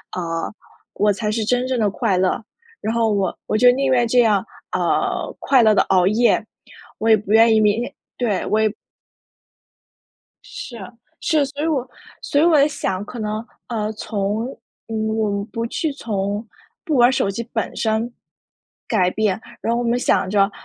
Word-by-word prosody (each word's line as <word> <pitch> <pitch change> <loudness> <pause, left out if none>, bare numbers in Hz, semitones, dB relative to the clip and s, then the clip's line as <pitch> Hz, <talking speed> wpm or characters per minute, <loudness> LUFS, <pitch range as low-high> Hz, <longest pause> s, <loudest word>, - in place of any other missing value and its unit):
呃， 165 0 -3 0.4
我 210 0 +2
才 210 +1 -2
是 220 0 -1
真 250 +3 +1
正 260 - 0
地 210 - +2
快 190 -1 0
乐， 185 +5 +1 0.4
然 220 - -2
后 225 -2 +2
我 200 -2 0
我 215 - +1
就 245 +2 +7
宁 270 +1 0
愿 240 -2 +3
这 245 +2 +3
样， 215 -3 +3 0.3
呃， - - 0
快 265 -3 +4
乐 215 -1 +5
地 - - +5
熬 185 -1 +3
夜， 225 +1 +3 0.5
我 225 - +1
也 220 - +7
不 210 +1 -3
愿 225 0 +6
意 220 - +4
明 210 +2 +3
天 245 - -5 0.2
对， 225 -6 0
我 215 +1 +1
也 215 -1 +1 1.7
是， 240 - -8 0.4
是， 305 -4 +2
所 285 +2 -5
以 325 - +1
我 265 -5 0 0.3
所 285 - 0
以 - - +4
我 320 -4 +5
也 285 - +5
想 190 -9 -3
可 245 - -9
能， 215 +1 -3 0.2
呃， 215 -2 -2
从 210 +1 -2 0.4
嗯， 220 -1 -1
我 220 -2 0
们 200 0 -2
不 230 -1 -2
去 315 +4 -2
从 205 -3 -3 0.4
不 310 -5 -1
玩 245 +1 +6
手 200 - +1
机 230 - -4
本 225 - -2
身 220 +2 0 0.8
改 185 -5 +2
变， 215 -3 0 0.2
然 230 - 0
后 240 - 0
我 235 - -1
们 240 +1 +2
想 185 - +1
着， 200 0 +3
220 Hz, 200 characters per minute, -21 LUFS, 205-245 Hz, 1.7 s, 就